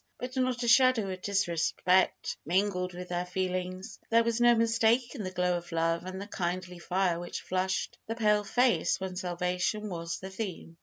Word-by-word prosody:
But 255 +1 -6
not 255 -1 0
a - - -1
shadow 235 -5 +5
of 185 0 -6
disrespect 185 -1 +1
mingled 180 +1 0
with 180 0 -7
their 175 0 -1
feelings. 185 +2 -3
There 230 0 +5
was 235 0 0
no 240 0 +6
mistaking 230 +2 +2
the 185 - -3
glow 180 -1 0
of 175 0 -9
love 165 +1 0
and 185 0 -5
the 200 - -5
kindly 180 -2 -4
fire 180 -1 0
which 175 0 -5
flushed 185 +1 -2
the 225 - -3
pale 210 -2 +3
face 245 -1 +2
when 190 -1 -5
salvation 180 +3 -1
was 165 -2 -4
the 190 0 -8
theme. 190 -5 -6
185 Hz, 175 wpm, -30 LUFS, 180-225 Hz, -, no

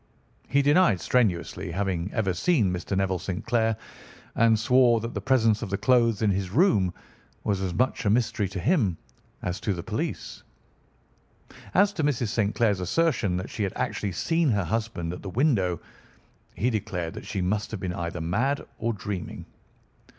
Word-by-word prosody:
He 140 +3 +2
denied 145 - +4
strenuously 100 -11 0
having 95 -1 -1
ever 100 -5 0
seen 105 - +2
Mr. 90 +2 -3
Neville 95 -2 0
St. 95 0 -5
Clair 115 -2 +1 0.6
and 115 -1 +4
swore 120 +1 +4
that 115 +2 -5
the - - -3
presence 115 -5 +3
of - - -4
the 100 - -1
clothes 115 0 +3
in 105 - +3
his 95 -1 -1
room 105 - +3 0.5
was 100 -3 0
as 95 -2 -1
much 125 +5 0
a 105 - +2
mystery 110 -2 +1
to 95 0 -5
him 110 - +2 0.5
as 90 +1 -2
to 100 - -1
the 85 - -6
police. - - -4 1.3
As 200 +2 +4
to 170 -6 -2
Mrs. 125 -6 +1
St. 105 -1 0
Clair's 105 -5 +2
assertion 105 - +1
that 90 - -5
she - - -5
had 100 -2 -1
actually 100 -2 -2
seen 165 - +1
her 100 -4 +1
husband 90 -3 -2
at 90 - -8
the 100 - -6
window, 95 - +1 0.8
he 125 +5 +1
declared 90 -6 -3
that - - -9
she 95 - -2
must 105 +3 -1
have 110 - -5
been 90 -1 -3
either 85 0 -4
mad 120 - 0
or 115 0 0
dreaming. 100 -3 -5
105 Hz, 175 wpm, -26 LUFS, 95-120 Hz, 1.3 s, denied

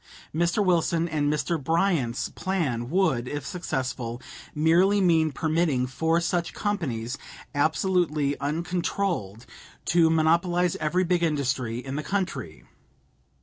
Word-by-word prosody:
Mr. 170 +6 +1
Wilson 170 -1 +2
and 150 -3 0
Mr. 150 0 -1
Bryan's 160 -6 +1
plan 140 -11 -2
would, 155 -9 +1
if 145 +2 -4
successful, 130 -8 -3 0.4
merely 175 +6 +4
mean 165 -4 +3
permitting 155 -4 +1
four 160 +6 +1
such 175 0 -1
companies, 140 - -2 0.3
absolutely 155 -1 +1
uncontrolled, 165 - -2 0.4
to 165 -1 +4
monopolize 170 +2 +2
every 175 +4 +1
big 175 -1 +1
industry 135 -7 0
in 135 +3 -5
the 150 - -3
country. 185 - -3
160 Hz, 110 wpm, -26 LUFS, 140-175 Hz, 0.4 s, merely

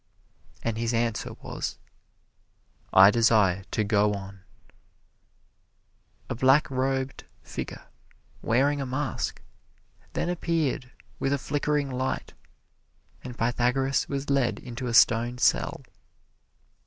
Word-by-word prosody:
And 115 -1 -2
his 115 0 0
answer 115 -2 -1
was, - - -4 1.1
"I 95 +2 +8
desire 105 -5 +3
to 110 - 0
go 105 0 +2
on." 100 0 -8 1.9
A - - -3
black 130 +5 +4
robed 130 0 -2 0.2
figure, - - -7 0.6
wearing 140 +5 +2
a - - -2
mask, 130 0 -3 0.7
then - - -1
appeared 165 -7 -1 0.3
with 135 - 0
a - - +2
flickering 145 0 -1
light, 130 +1 -3 0.9
and 125 -1 -8
Pythagoras 125 +3 +1
was 140 0 -3
led 135 -3 +2
into 125 +1 -6
a 120 - -2
stone 120 +2 +4
cell. 120 - +1
125 Hz, 105 wpm, -27 LUFS, 115-135 Hz, 1.9 s, I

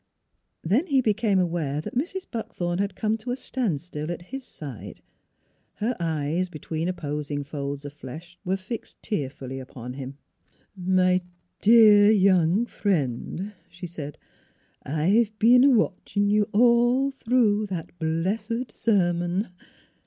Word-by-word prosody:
Then 235 - +2
he 275 -4 +3
became 215 -3 +2
aware 165 -5 0
that 155 - -6
Mrs. 360 +9 -2
Buckthorn 175 -6 -3
had 200 0 -1
come 220 0 0
to 245 - -8
a 245 - 0
standstill 175 - -3
at 175 0 -6
his 270 0 -4
side; 140 - -9 0.8
her 230 +4 -1
eyes, 165 +2 -1
between 160 +1 -4
opposing 150 -4 -3
folds 140 0 -5
of 145 - -7
flesh, 155 +5 -10
were 190 0 0
fixed 210 +4 -8
tear 145 -11 -2
fully 135 -1 -7
upon 125 -1 -8
him. 135 0 -7 0.4
" - - -37
My 185 0 +2 0.4
de 215 -2 +7
ar - - +7
young 190 0 +4
friend," 185 - -2 0.2
she 175 +1 -9
said, 150 -4 -7 0.4
" - - -39 0.2
I've 200 - +1
been 245 +3 +6
a 280 - +7
watchin' 205 -3 +1
you 210 +1 +2
all 240 +4 +4
through 225 -5 +2
that 180 -5 -5
b 160 - -1
lessed 210 +9 -1
sermon. 175 -2 +1
185 Hz, 145 wpm, -25 LUFS, 155-220 Hz, 0.8 s, de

